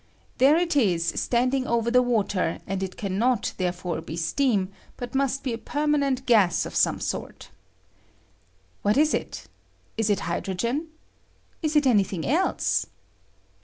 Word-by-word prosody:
There 280 Hz, +5 st, +6 dB
it 345 Hz, -2 st, 0 dB
is 185 Hz, -11 st, +2 dB
standing 255 Hz, +2 st, +1 dB
over 235 Hz, 0 st, +1 dB
the 250 Hz, +1 st, +5 dB
water, 205 Hz, -8 st, 0 dB
and 195 Hz, 0 st, -3 dB
it 190 Hz, -1 st, -5 dB
can 195 Hz, -1 st, -3 dB
not 245 Hz, -1 st, +1 dB
therefore 180 Hz, -2 st, -2 dB
be 160 Hz, +1 st, -7 dB
steam, 195 Hz, +2 st, +1 dB, 0.3 s
but 245 Hz, -, -6 dB
must 275 Hz, 0 st, 0 dB
be 255 Hz, -, -2 dB
a 230 Hz, -, -5 dB
permanent 285 Hz, -3 st, 0 dB
gas 205 Hz, -8 st, +3 dB
of -, -, -7 dB
some -, -, +2 dB
sort. -, -, -5 dB, 1.3 s
What 205 Hz, +3 st, +2 dB
is 305 Hz, +1 st, +4 dB
it? -, -, -4 dB, 0.5 s
la 225 Hz, -, +2 dB
it 200 Hz, -, +1 dB
hydrogen? 215 Hz, -, -2 dB, 0.7 s
Is 310 Hz, -2 st, -1 dB
it 295 Hz, -1 st, +4 dB
any 220 Hz, -6 st, +5 dB
thing 185 Hz, -4 st, -5 dB
else? 335 Hz, +8 st, +1 dB
235 Hz, 150 wpm, -25 LUFS, 190-275 Hz, 1.3 s, There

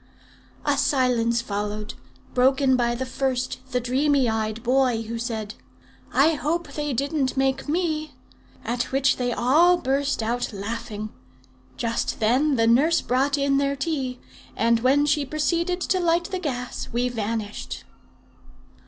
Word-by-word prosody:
"'A -, -, +2 dB
silence 235 Hz, -3 st, +2 dB
followed, 210 Hz, 0 st, -4 dB, 0.4 s
broken 260 Hz, +1 st, +3 dB
by 240 Hz, -1 st, +1 dB
the 260 Hz, +2 st, -3 dB
first, 255 Hz, -1 st, -2 dB
the 250 Hz, -1 st, 0 dB
dreamy 265 Hz, +2 st, +2 dB
eyed 220 Hz, 0 st, -2 dB
boy, 250 Hz, -2 st, +2 dB
who 230 Hz, +1 st, -5 dB
said, 220 Hz, -3 st, -4 dB, 0.6 s
"'I 310 Hz, +4 st, +4 dB
hope 310 Hz, 0 st, -2 dB
they 295 Hz, 0 st, -2 dB
didn't 275 Hz, +1 st, -1 dB
make 270 Hz, +1 st, 0 dB
me;' 310 Hz, -3 st, -1 dB, 0.5 s
at 240 Hz, +1 st, -1 dB
which 270 Hz, +1 st, +2 dB
they 245 Hz, -1 st, -1 dB
all 310 Hz, +10 st, +4 dB
burst 275 Hz, -4 st, 0 dB
out 240 Hz, +3 st, -1 dB
laughing. 215 Hz, +1 st, -5 dB, 0.7 s
Just 230 Hz, -1 st, -2 dB
then 260 Hz, +7 st, +3 dB
the 230 Hz, -2 st, +3 dB
nurse 285 Hz, +9 st, +4 dB
brought 270 Hz, +3 st, +1 dB
in 275 Hz, 0 st, +2 dB
their 280 Hz, 0 st, 0 dB
tea, 270 Hz, -4 st, -2 dB, 0.4 s
and 230 Hz, +1 st, +3 dB
when 270 Hz, +4 st, +3 dB
she 295 Hz, 0 st, +2 dB
proceeded 335 Hz, +5 st, 0 dB
to 370 Hz, +1 st, +1 dB
light 345 Hz, 0 st, +1 dB
the 375 Hz, -, -2 dB
gas, 250 Hz, -7 st, -4 dB
we 240 Hz, +1 st, 0 dB
vanished." 220 Hz, -2 st, -4 dB
260 Hz, 140 wpm, -24 LUFS, 235-290 Hz, 0.7 s, I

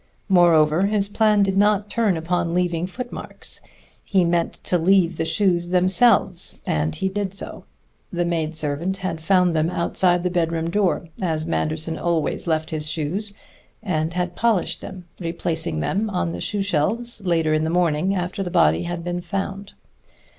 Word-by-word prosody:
Moreover, 170 Hz, -1 st, +4 dB
his 205 Hz, -1 st, +1 dB
plan 210 Hz, 0 st, +3 dB
did 195 Hz, -1 st, 0 dB
not 205 Hz, 0 st, +3 dB
turn 210 Hz, -5 st, +1 dB
upon 170 Hz, +1 st, -1 dB
leaving 175 Hz, -1 st, 0 dB
footmarks. 245 Hz, +6 st, -7 dB, 0.4 s
He 190 Hz, -3 st, +2 dB
meant 170 Hz, 0 st, +1 dB
to 180 Hz, -, +1 dB
leave 175 Hz, -1 st, +3 dB
the 160 Hz, -, -1 dB
shoes 175 Hz, 0 st, +1 dB
themselves, 185 Hz, +1 st, +3 dB
and 75 Hz, 0 st, -1 dB
he 190 Hz, -, -1 dB
did 195 Hz, 0 st, -3 dB
so. -, -, -3 dB, 0.5 s
The 175 Hz, -1 st, -1 dB
maidservant 160 Hz, +1 st, -2 dB
had 185 Hz, -4 st, -4 dB
found 180 Hz, 0 st, +3 dB
them 155 Hz, +1 st, +2 dB
outside 175 Hz, 0 st, +1 dB
the 180 Hz, -, 0 dB
bedroom 165 Hz, -1 st, 0 dB
door, 185 Hz, -3 st, 0 dB
as 160 Hz, -4 st, 0 dB
Manderson 160 Hz, 0 st, -2 dB
always 170 Hz, -1 st, -1 dB
left 160 Hz, -1 st, 0 dB
his 155 Hz, -1 st, -2 dB
shoes, 180 Hz, +7 st, -3 dB, 0.5 s
and 165 Hz, -4 st, -1 dB
had 180 Hz, -1 st, -2 dB
polished 230 Hz, -6 st, 0 dB
them, 180 Hz, -2 st, -9 dB
replacing 165 Hz, -, -2 dB
them 210 Hz, -, -1 dB
on 180 Hz, -3 st, -1 dB
the -, -, -6 dB
shoe 205 Hz, -2 st, -1 dB
shelves 205 Hz, +7 st, -1 dB
later 165 Hz, -4 st, +1 dB
in 155 Hz, 0 st, +1 dB
the 160 Hz, -, 0 dB
morning, 175 Hz, +2 st, +1 dB
after 180 Hz, +1 st, -3 dB
the 185 Hz, -, -2 dB
body 80 Hz, -, +3 dB
had 175 Hz, 0 st, -4 dB
been 175 Hz, 0 st, -3 dB
found. 195 Hz, +2 st, -4 dB
175 Hz, 160 wpm, -22 LUFS, 165-195 Hz, 0.5 s, Moreover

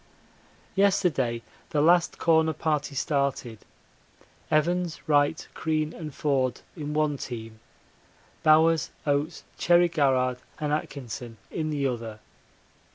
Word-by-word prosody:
Yesterday 160 Hz, -, +2 dB, 0.3 s
the 150 Hz, -, 0 dB
last 170 Hz, +3 st, +4 dB
Corner 160 Hz, -1 st, +3 dB
Party 150 Hz, -2 st, -1 dB
started: 135 Hz, -5 st, -1 dB, 0.9 s
Evans, 170 Hz, +2 st, +1 dB
Wright, 145 Hz, +1 st, +2 dB
Crean, 155 Hz, -1 st, -1 dB
and 155 Hz, -3 st, -7 dB
Forde 135 Hz, -3 st, 0 dB
in 150 Hz, -3 st, -5 dB
one 150 Hz, -2 st, +1 dB
team; 115 Hz, -3 st, -7 dB, 0.8 s
Bowers, 160 Hz, +1 st, +4 dB, 0.2 s
Oates, 145 Hz, +3 st, 0 dB, 0.2 s
Cherry 175 Hz, 0 st, +5 dB
Garrard, 130 Hz, -5 st, +2 dB, 0.2 s
and 150 Hz, -1 st, -1 dB
Atkinson 120 Hz, -6 st, -5 dB
in 155 Hz, -1 st, -2 dB
the 145 Hz, -2 st, -1 dB
other. 115 Hz, -4 st, -3 dB
150 Hz, 105 wpm, -27 LUFS, 130-160 Hz, 0.9 s, Cherry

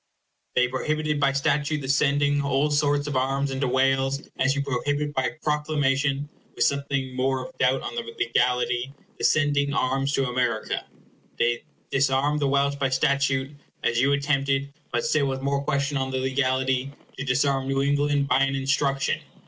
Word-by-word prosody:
They 125 Hz, 0 st, +4 dB
prohibited 150 Hz, +3 st, -1 dB
by 140 Hz, -1 st, +3 dB
statute 145 Hz, +2 st, 0 dB
the 135 Hz, -, -6 dB
sending 145 Hz, +1 st, +2 dB
all 140 Hz, +1 st, +1 dB
sorts 145 Hz, 0 st, +2 dB
of 145 Hz, -2 st, -3 dB
arms 135 Hz, +2 st, 0 dB
into 135 Hz, 0 st, -1 dB
Wales, 135 Hz, +2 st, +1 dB
as 135 Hz, +2 st, +2 dB
you 140 Hz, -, 0 dB
prohibit 145 Hz, +2 st, -1 dB
by 130 Hz, +3 st, -1 dB
proclamation 145 Hz, -2 st, 0 dB, 0.3 s
(with -, -, +1 dB
something 140 Hz, -2 st, -1 dB
more 130 Hz, 0 st, 0 dB
of -, -, -18 dB
doubt 130 Hz, +1 st, +2 dB
on -, -, -5 dB
the 120 Hz, -, -2 dB
legality) 120 Hz, +2 st, 0 dB, 0.2 s
the -, -, -6 dB
sending 145 Hz, -2 st, +2 dB
arms 135 Hz, +2 st, 0 dB
to 135 Hz, -2 st, +1 dB
America. 125 Hz, -3 st, -1 dB, 0.5 s
They 120 Hz, +4 st, 0 dB, 0.3 s
disarmed 135 Hz, +2 st, +2 dB
the 145 Hz, -, +1 dB
Welsh 140 Hz, +1 st, +1 dB
by 135 Hz, -1 st, 0 dB
statute, 135 Hz, +1 st, +1 dB, 0.3 s
as 120 Hz, +1 st, +2 dB
you 140 Hz, +2 st, +3 dB
attempted 140 Hz, -1 st, 0 dB, 0.2 s
(but 155 Hz, -, -1 dB
still 155 Hz, -2 st, +2 dB
with 135 Hz, 0 st, -3 dB
more 140 Hz, 0 st, 0 dB
question 140 Hz, 0 st, 0 dB
on 130 Hz, 0 st, -1 dB
the 130 Hz, -, -2 dB
legality) 130 Hz, 0 st, 0 dB, 0.3 s
to -, -, -2 dB
disarm 135 Hz, 0 st, +1 dB
New 135 Hz, 0 st, +1 dB
England 145 Hz, 0 st, +1 dB
by 130 Hz, 0 st, +3 dB
an 135 Hz, 0 st, +1 dB
instruction. 135 Hz, 0 st, 0 dB
135 Hz, 165 wpm, -25 LUFS, 130-145 Hz, 0.5 s, They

